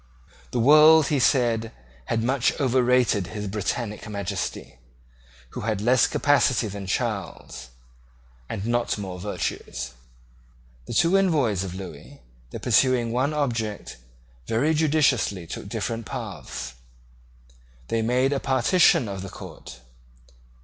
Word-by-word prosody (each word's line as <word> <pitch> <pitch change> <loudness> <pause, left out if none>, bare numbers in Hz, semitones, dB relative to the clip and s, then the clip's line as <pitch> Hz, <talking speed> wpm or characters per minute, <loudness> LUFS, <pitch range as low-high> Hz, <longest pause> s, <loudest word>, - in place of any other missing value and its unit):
The - - -2
world, 155 +4 +7
he 145 - +1
said, 115 -4 +2 0.3
had 115 +7 -1
much 130 +3 +1
overrated 125 - +2
His 105 -1 -6
Britannic 105 +2 -3
Majesty, 100 - -5 0.7
who - - -6
had 110 -2 -1
less 125 +4 +3
capacity 130 -5 +2
than 100 -1 -7
Charles, 60 -8 -4 0.8
and 100 - -4
not 120 0 0
more 95 -3 -6
virtues. 80 -9 -4 1.0
The - - -5
two 170 +6 +3
envoys 145 - +1
of 90 -2 -6
Lewis, 90 -6 -9 0.3
though - - -7
pursuing 125 -3 +2
one 130 +5 0
object, 115 - -3 0.5
very 140 +8 +1
judiciously 150 - +1
took - - -7
different 115 -1 -4
paths. 65 -2 -6 1.2
They 115 - 0
made 125 +4 +1
a 140 - 0
partition 130 - +3
of 100 -2 -5
the 95 - -7
court. 65 -7 -11
115 Hz, 120 wpm, -24 LUFS, 100-135 Hz, 1.2 s, world